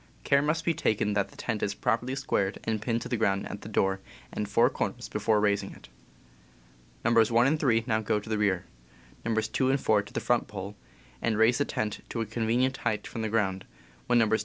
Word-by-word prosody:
Care 140 0 +4
must 155 +3 0
be 170 - +3
taken 105 -7 0
that 100 -1 0
the - - -18
tent 110 -4 -3
is 100 - -1
properly 125 +3 0
squared 100 -8 -1
and 110 -2 -1
pinned 115 +1 -1
to - - -6
the 120 - -1
ground 100 -3 +1
at 100 - -7
the 105 - -8
door 95 -2 +1 0.3
and - - -3
four - - +4
corners - - -3
before 110 -2 +1
raising 105 -1 +1
it. - - -15 1.2
Nos. 115 -2 +5
1 120 +1 +4
and 155 +3 +2
3 115 -6 +3
now 110 -2 +1
go 105 0 0
to 105 - -13
the 110 -1 -1
rear, 95 -3 +1 0.6
Nos. 110 -1 0
2 130 +4 +1
and 135 +1 +2
4 110 -4 +3
to 100 - -13
the - - -2
front 120 -1 +1
pole, 100 0 -7 0.5
and 110 -2 +1
raise 115 +4 +4
the 145 - +2
tent 105 -1 -2
to 115 - -4
a 115 - 0
convenient 120 +4 0
height 105 - -2
from 115 - -5
the 110 - -1
ground, 95 -4 0 0.4
when 120 - +4
Nos. 110 -1 +3
110 Hz, 225 wpm, -28 LUFS, 105-120 Hz, 1.2 s, Nos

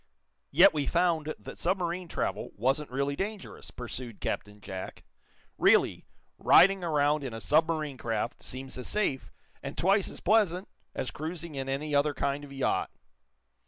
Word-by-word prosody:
"Yet 175 +7 +7
we 145 -3 -1
found 165 -3 +1
that - - -10
submarine 180 0 -1
travel - - -3
wasn't 135 +7 0
really 140 +2 -1
dangerous," 200 +3 -5
pursued 120 -2 -6
Captain 105 0 -4
Jack. 95 -2 -7 0.6
"Really, - - +3 0.3
riding 195 0 +6
around 150 -2 +2
in 125 -4 -5
a - - -5
submarine 155 0 +1
craft 115 -2 -2
seems 130 0 -6
as 125 - -4
safe, 195 -11 0 0.3
and 140 0 -7
twice 195 +2 +3
as - - -9
pleasant, 195 -2 +2 0.3
as 130 - -3
cruising 165 +1 -5
in 135 -1 -4
any 145 +3 -2
other 145 0 +2
kind 140 +1 -1
of 145 - -10
yacht." 135 -1 0
150 Hz, 150 wpm, -29 LUFS, 135-175 Hz, 0.6 s, Yet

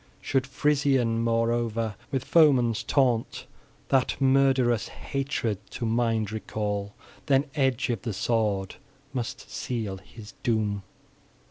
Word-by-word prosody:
Should 130 -1 0
Frisian, 135 -4 +2
moreover, 115 -1 0 0.2
with 135 -2 -2
foeman's 125 -8 +4
taunt, 120 -1 +1 0.4
that 130 -2 +2
murderous 130 -4 +3
hatred 135 -7 -3
to 120 - -4
mind 115 -2 +1
recall, 105 -2 -3 0.3
then 135 0 +4
edge 135 -3 +1
of 115 -5 -2
the 115 - -3
sword 105 -1 0 0.4
must 120 -3 -4
seal 110 -6 -3
his 105 +2 -12
doom. 105 -3 0
115 Hz, 110 wpm, -27 LUFS, 110-135 Hz, 0.4 s, foeman's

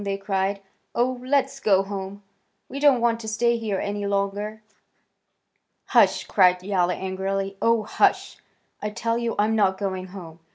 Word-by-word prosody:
they 200 -1 -2
cried. 195 0 -1 0.4
"Oh, 250 +1 0
let's 275 +1 0
go 195 -6 +3
home. 195 0 -6 0.4
We 275 - -6
don't 280 -4 +4
want 230 -1 +2
to 225 - -8
stay 235 +2 +1
here 215 -4 -2
any 205 +1 -3
longer." 200 +2 -2 1.3
"Hush!" - - +4
cried 180 -2 +3
Yowler 185 -2 +1
angrily. 195 +1 -3
"Oh, 230 -1 +3
hush! - - +1 0.4
I 210 - -2
tell 230 +2 -2
you 235 -1 -2
I'm 215 +2 +2
not 195 -3 +2
going 190 -2 -3
home. 175 -4 -11
200 Hz, 155 wpm, -24 LUFS, 195-230 Hz, 1.3 s, don't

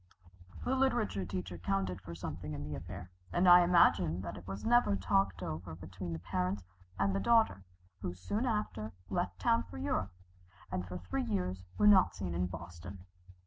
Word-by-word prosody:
The 260 - +1
literature 240 - +1
teacher 90 -2 -4
counted 90 0 -1
for 85 -2 -8
something 80 -1 -5
in 75 - -5
the 75 +1 -5
affair, 90 +5 -7 0.2
and 175 +1 +3
I 175 0 +10
imagine 95 - +4
that - - -5
it 90 - -11
was 95 0 -5
never 240 - +4
talked 95 -1 +1
over 80 +1 -5
between 90 +1 -6
the - - -3
parents 90 +3 -2 0.3
and 100 0 +1
daughter, 225 - +3 0.3
who 90 - -4
soon 210 - -2
after 210 - -2 0.2
left 95 0 -1
town 115 +6 +3
for 90 - -8
Europe, 95 +1 -1 0.6
and 90 0 -2
for 90 0 -5
three 90 +9 -3
years 95 -4 -2
were 210 - +3
not 200 -3 +6
seen 90 -3 -4
in 90 +1 0
Boston. 90 +1 -9
95 Hz, 175 wpm, -33 LUFS, 90-105 Hz, 0.6 s, I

